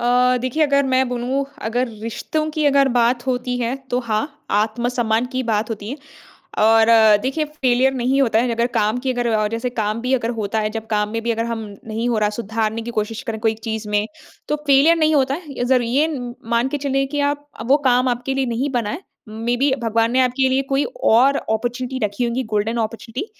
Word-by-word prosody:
अ, 250 Hz, +1 st, +3 dB
देखिए 255 Hz, +5 st, 0 dB
अगर 280 Hz, -1 st, +3 dB
मैं 260 Hz, 0 st, +2 dB
बोलूँ 250 Hz, +3 st, -1 dB, 0.2 s
अगर 245 Hz, +2 st, 0 dB
रिश्तों 310 Hz, +7 st, -3 dB
की 305 Hz, 0 st, -2 dB
अगर 275 Hz, -1 st, +4 dB
बात 240 Hz, +1 st, +2 dB
होती 250 Hz, -1 st, -1 dB
है 240 Hz, +1 st, -1 dB, 0.2 s
तो 245 Hz, -, +1 dB
हाँ, 235 Hz, +5 st, -3 dB
आत्मसम्मान 225 Hz, +2 st, 0 dB
की 260 Hz, 0 st, -1 dB
बात 220 Hz, -1 st, -1 dB
होती 210 Hz, -1 st, -5 dB
है। 280 Hz, -, -4 dB, 0.6 s
और 225 Hz, +1 st, +5 dB, 0.4 s
देखिए 270 Hz, +4 st, -1 dB
फेलियर 265 Hz, -3 st, +1 dB
नहीं 260 Hz, +2 st, +1 dB
होता 225 Hz, -4 st, +2 dB
है 245 Hz, +1 st, +1 dB
अगर 235 Hz, +1 st, +1 dB
काम 215 Hz, +3 st, +1 dB
की 260 Hz, 0 st, -1 dB
अगर 245 Hz, -1 st, -1 dB
और 215 Hz, -1 st, +1 dB
जैसे 230 Hz, +3 st, -3 dB
काम 220 Hz, -1 st, -2 dB
भी 250 Hz, +2 st, -2 dB
अगर 235 Hz, -2 st, 0 dB
होता 210 Hz, +1 st, -1 dB
है 215 Hz, 0 st, -1 dB
जब 225 Hz, 0 st, -6 dB
काम 210 Hz, -1 st, 0 dB
में 225 Hz, 0 st, -2 dB
भी 235 Hz, -, -1 dB
अगर 230 Hz, 0 st, 0 dB
हम 230 Hz, -1 st, -3 dB, 0.3 s
नहीं 225 Hz, +2 st, -2 dB
हो 235 Hz, -2 st, +1 dB
रहा 210 Hz, -1 st, +2 dB
सुधारने 220 Hz, 0 st, -2 dB
की 235 Hz, -, -5 dB
कोशिश 220 Hz, +3 st, -2 dB
करें 225 Hz, -4 st, -4 dB
कोई 220 Hz, 0 st, +1 dB
चीज़ 220 Hz, -1 st, -3 dB
में 210 Hz, 0 st, +1 dB, 0.4 s
तो 300 Hz, -, +1 dB
फेलियर 280 Hz, +4 st, +5 dB
नहीं 315 Hz, -1 st, +2 dB
होता 270 Hz, -2 st, +2 dB
है। 305 Hz, -2 st, -8 dB
इधर 250 Hz, -1 st, +1 dB
ये 265 Hz, +7 st, +2 dB
उम, 245 Hz, -1 st, -6 dB, 0.2 s
मान 235 Hz, +2 st, +2 dB
के 290 Hz, +2 st, -3 dB
चलें 275 Hz, -1 st, 0 dB
कि 290 Hz, +1 st, -2 dB
आप 290 Hz, 0 st, -6 dB
अ, -, -, -3 dB
वो 270 Hz, +4 st, +4 dB
काम 250 Hz, 0 st, +3 dB
आपके 245 Hz, +2 st, -2 dB
लिए 270 Hz, -1 st, 0 dB
नहीं 250 Hz, +4 st, -1 dB
बना 235 Hz, -5 st, -1 dB
है। 310 Hz, +7 st, -5 dB, 0.3 s
मेबी 240 Hz, +5 st, 0 dB
भगवान 230 Hz, 0 st, +1 dB
ने 260 Hz, -, +3 dB
आपके 260 Hz, +1 st, +2 dB
लिए 265 Hz, +1 st, +1 dB
कोई 275 Hz, +1 st, +2 dB, 0.2 s
और 260 Hz, +5 st, +5 dB
अपॉर्चुनिटी 245 Hz, +3 st, -2 dB
रखी 205 Hz, +4 st, -3 dB
होंगी 240 Hz, +2 st, -1 dB
गोल्डन 220 Hz, +3 st, 0 dB
अपॉर्चुनिटी 230 Hz, -, -7 dB
245 Hz, 220 wpm, -20 LUFS, 225-265 Hz, 0.6 s, और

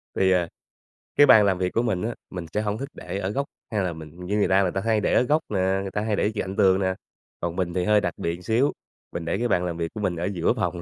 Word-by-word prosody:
Thì, 95 Hz, -1 st, +3 dB
à, 90 Hz, -2 st, +2 dB, 0.7 s
cái 145 Hz, -, +7 dB
bàn 105 Hz, -2 st, +8 dB
làm 95 Hz, -2 st, +2 dB
việc 90 Hz, 0 st, -1 dB
của 115 Hz, -, +2 dB
mình 110 Hz, -7 st, -1 dB
á, 115 Hz, +2 st, -2 dB
mình 90 Hz, -3 st, -6 dB
sẽ 105 Hz, -, +1 dB
hổng 105 Hz, 0 st, -2 dB
thích 140 Hz, +4 st, -5 dB
để -, -, -6 dB
ở 95 Hz, -1 st, -2 dB
góc 140 Hz, +7 st, -1 dB, 0.3 s
hay 105 Hz, -3 st, 0 dB
là 90 Hz, -2 st, -1 dB
mình 80 Hz, +3 st, -10 dB
như 100 Hz, +3 st, -1 dB
người 105 Hz, -, +3 dB
ta, 95 Hz, +1 st, +4 dB
người 90 Hz, -2 st, +1 dB
ta 95 Hz, -, -2 dB
hay 110 Hz, -1 st, +1 dB
để -, -, +1 dB
ở -, -, +5 dB
góc 150 Hz, +5 st, +2 dB
nè, 100 Hz, -, -1 dB, 0.2 s
người 95 Hz, -, -5 dB
ta 105 Hz, -, -2 dB
hay 110 Hz, -1 st, 0 dB
để 105 Hz, -, +1 dB
cạnh 95 Hz, -1 st, -3 dB
tường 95 Hz, -2 st, +4 dB
nè. 95 Hz, -1 st, +1 dB, 0.5 s
Còn 85 Hz, 0 st, -3 dB
mình 90 Hz, -2 st, -1 dB
thì 90 Hz, 0 st, 0 dB
hơi 105 Hz, 0 st, +4 dB
đặc 85 Hz, -3 st, -1 dB
biệt 85 Hz, +1 st, -3 dB
xíu, 120 Hz, +6 st, +2 dB, 0.4 s
mình 85 Hz, -, -5 dB
để 85 Hz, +3 st, -1 dB
cái 120 Hz, +3 st, 0 dB
bàn 90 Hz, -5 st, +1 dB
làm 85 Hz, -2 st, -3 dB
việc 85 Hz, -1 st, -3 dB
của 110 Hz, -, -5 dB
mình 95 Hz, -4 st, 0 dB
ở 85 Hz, +1 st, -3 dB
giữa 90 Hz, -4 st, +1 dB
phòng 85 Hz, -1 st, -2 dB
95 Hz, 300 wpm, -25 LUFS, 90-105 Hz, 0.7 s, bàn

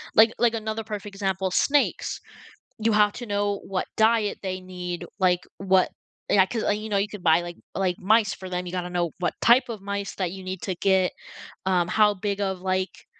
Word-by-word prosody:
Like 225 Hz, +1 st, +7 dB
like, 235 Hz, -1 st, +3 dB
another 220 Hz, 0 st, -3 dB
perfect 210 Hz, -2 st, -6 dB
example, 190 Hz, -1 st, -1 dB
snakes, 285 Hz, +9 st, +1 dB, 0.6 s
you 220 Hz, 0 st, +2 dB
have 210 Hz, 0 st, +5 dB
to 245 Hz, -, -7 dB
know 205 Hz, -1 st, -1 dB
what 190 Hz, -1 st, -2 dB
diet 220 Hz, -1 st, +3 dB
they 185 Hz, -1 st, -3 dB
need, 180 Hz, -1 st, -6 dB
like, 180 Hz, -2 st, +3 dB, 0.2 s
what 190 Hz, -1 st, +3 dB, 0.4 s
yeah, 195 Hz, -, +6 dB
'cause, 225 Hz, +2 st, -3 dB
uh, -, -, 0 dB
you 215 Hz, +1 st, -3 dB
know 205 Hz, -, +1 dB
you 200 Hz, +1 st, +1 dB
could 210 Hz, -2 st, -9 dB
buy 165 Hz, 0 st, +5 dB
like 175 Hz, 0 st, -7 dB, 0.2 s
like, 185 Hz, -2 st, 0 dB
mice 220 Hz, +3 st, +3 dB
for 185 Hz, -, -8 dB
them, 180 Hz, 0 st, -3 dB
you 175 Hz, -, -6 dB
gotta 180 Hz, -1 st, -3 dB
know 175 Hz, -2 st, -1 dB
what 180 Hz, -, 0 dB
type 240 Hz, +2 st, +5 dB
of 225 Hz, -3 st, -5 dB
mice 200 Hz, 0 st, -4 dB
that 185 Hz, -3 st, -2 dB
you 190 Hz, 0 st, -8 dB
need 185 Hz, 0 st, -5 dB
to 190 Hz, -, -1 dB
get, 190 Hz, 0 st, +2 dB, 0.6 s
um, 180 Hz, -2 st, +2 dB
how 210 Hz, +2 st, +4 dB
big 200 Hz, +1 st, -2 dB
of 190 Hz, -2 st, -2 dB
like, 185 Hz, 0 st, -2 dB
195 Hz, 210 wpm, -25 LUFS, 185-210 Hz, 0.6 s, Like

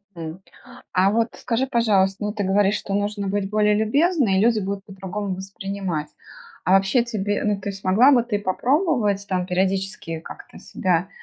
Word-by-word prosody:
М, 165 Hz, +2 st, -7 dB, 0.5 s
а 190 Hz, +2 st, +3 dB
вот, 225 Hz, +1 st, +1 dB
скажи, 250 Hz, +2 st, -1 dB
пожалуйста, 205 Hz, -5 st, +2 dB
ну, 210 Hz, 0 st, -2 dB
ты 210 Hz, -2 st, -2 dB
говоришь, 200 Hz, +1 st, +2 dB
что 195 Hz, -, -5 dB
нужно 205 Hz, 0 st, -1 dB
быть 195 Hz, 0 st, -1 dB
более 210 Hz, 0 st, +3 dB
любезной, 260 Hz, -, +2 dB
и -, -, +3 dB
люди 225 Hz, +1 st, +3 dB
будут 200 Hz, 0 st, -4 dB
по-другому 195 Hz, 0 st, -5 dB
воспринимать. 190 Hz, -4 st, -4 dB, 0.6 s
А 185 Hz, -, +2 dB
вообще 195 Hz, +5 st, +4 dB
тебе 205 Hz, -4 st, -2 dB
ну, 210 Hz, -1 st, 0 dB
ты 200 Hz, +1 st, -4 dB
смогла 195 Hz, +7 st, +4 dB
бы 245 Hz, -4 st, +4 dB
ты 230 Hz, -3 st, -1 dB
попробовать, 220 Hz, -, +1 dB
там, 180 Hz, -1 st, -1 dB
периодически 190 Hz, -2 st, -1 dB
как-то 160 Hz, -, -12 dB
себя, 180 Hz, 0 st, -1 dB
200 Hz, 165 wpm, -22 LUFS, 190-215 Hz, 0.6 s, вообще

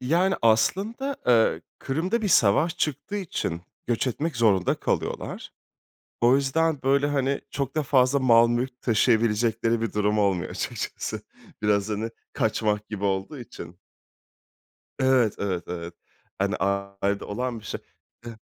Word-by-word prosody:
Yani 170 Hz, +9 st, +2 dB
aslında, 205 Hz, -, +1 dB
eee, 115 Hz, -2 st, +3 dB, 0.2 s
Kırım'da 180 Hz, +12 st, -1 dB
bir 205 Hz, -, 0 dB
savaş 160 Hz, -, +4 dB
çıktığı 155 Hz, +7 st, -2 dB
için 150 Hz, -, -3 dB, 0.3 s
göç 120 Hz, +2 st, 0 dB
etmek 145 Hz, +4 st, -2 dB
zorunda 105 Hz, -6 st, +3 dB
kalıyorlar. -, -, -3 dB, 0.7 s
O 120 Hz, +3 st, +5 dB
yüzden, 145 Hz, +2 st, +1 dB
böyle, 140 Hz, +2 st, +3 dB
hani, 140 Hz, -1 st, 0 dB
çok 135 Hz, +1 st, -3 dB
da 155 Hz, -, +2 dB
fazla 135 Hz, 0 st, +3 dB
mal 120 Hz, -3 st, +5 dB
mülk 125 Hz, +2 st, -2 dB
taşıyabilecekleri 115 Hz, 0 st, +2 dB
bir 115 Hz, -, -2 dB
durum 105 Hz, 0 st, +1 dB
olmuyor 100 Hz, -4 st, +1 dB
açıkçası. -, -, -4 dB, 0.4 s
Biraz 105 Hz, 0 st, +2 dB
hani, 110 Hz, +2 st, -2 dB, 0.2 s
kaçmak 105 Hz, -1 st, 0 dB
gibi 105 Hz, -2 st, -5 dB
olduğu 95 Hz, +8 st, -1 dB
için. 90 Hz, -7 st, -10 dB, 1.2 s
Evet, 130 Hz, -5 st, +3 dB
evet, 95 Hz, -3 st, -2 dB
evet. 85 Hz, -1 st, -6 dB, 0.4 s
Hani, -, -, 0 dB
ailede 100 Hz, +1 st, -1 dB
olan 120 Hz, +2 st, -3 dB
bir -, -, -18 dB
şey. -, -, -5 dB, 0.5 s
E 115 Hz, -2 st, -7 dB
115 Hz, 135 wpm, -25 LUFS, 105-140 Hz, 1.2 s, O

